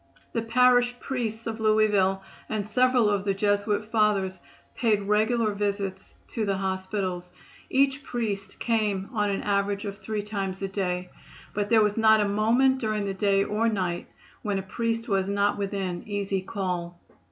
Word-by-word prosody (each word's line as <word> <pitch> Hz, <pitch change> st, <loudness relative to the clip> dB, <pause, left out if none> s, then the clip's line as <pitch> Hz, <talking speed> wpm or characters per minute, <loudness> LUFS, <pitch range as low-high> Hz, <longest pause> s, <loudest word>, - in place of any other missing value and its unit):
The 230 Hz, -, 0 dB
parish 245 Hz, +1 st, +3 dB
priests 230 Hz, -4 st, -3 dB
of 225 Hz, 0 st, -4 dB
Louisville 210 Hz, -3 st, +3 dB, 0.3 s
and 210 Hz, -2 st, -2 dB
several 250 Hz, +1 st, +3 dB
of 205 Hz, -2 st, +1 dB
the 200 Hz, -1 st, 0 dB
Jesuit 205 Hz, +1 st, +1 dB
Fathers 210 Hz, -4 st, +1 dB, 0.3 s
paid 215 Hz, -4 st, +1 dB
regular 215 Hz, +2 st, +2 dB
visits 200 Hz, -2 st, -3 dB
to 225 Hz, -, -2 dB
the 200 Hz, -2 st, 0 dB
hospitals. 190 Hz, -1 st, -2 dB, 0.4 s
Each 270 Hz, +1 st, +2 dB
priest 200 Hz, -5 st, -3 dB
came 210 Hz, -4 st, 0 dB
on 210 Hz, -2 st, +1 dB
an 195 Hz, -, -2 dB
average 200 Hz, 0 st, 0 dB
of 200 Hz, 0 st, -5 dB
three 210 Hz, +1 st, -3 dB
times 195 Hz, -2 st, -3 dB
a -, -, 0 dB
day, 180 Hz, -2 st, -2 dB, 0.4 s
but 205 Hz, 0 st, -1 dB
there 225 Hz, -2 st, +5 dB
was 210 Hz, +1 st, +1 dB
not 220 Hz, -1 st, +6 dB
a 205 Hz, -, +2 dB
moment 235 Hz, +6 st, +3 dB
during 215 Hz, -4 st, -1 dB
the 195 Hz, -, -2 dB
day 195 Hz, 0 st, +2 dB
or 220 Hz, +3 st, +1 dB
night 185 Hz, -5 st, -2 dB, 0.3 s
when 205 Hz, -2 st, -1 dB
a 190 Hz, -, -3 dB
priest 230 Hz, +3 st, -2 dB
was 195 Hz, -3 st, +1 dB
not 200 Hz, 0 st, +1 dB
within 195 Hz, -3 st, -2 dB
easy 200 Hz, -2 st, -1 dB
call. 180 Hz, -3 st, -4 dB
205 Hz, 165 wpm, -26 LUFS, 195-220 Hz, 0.4 s, not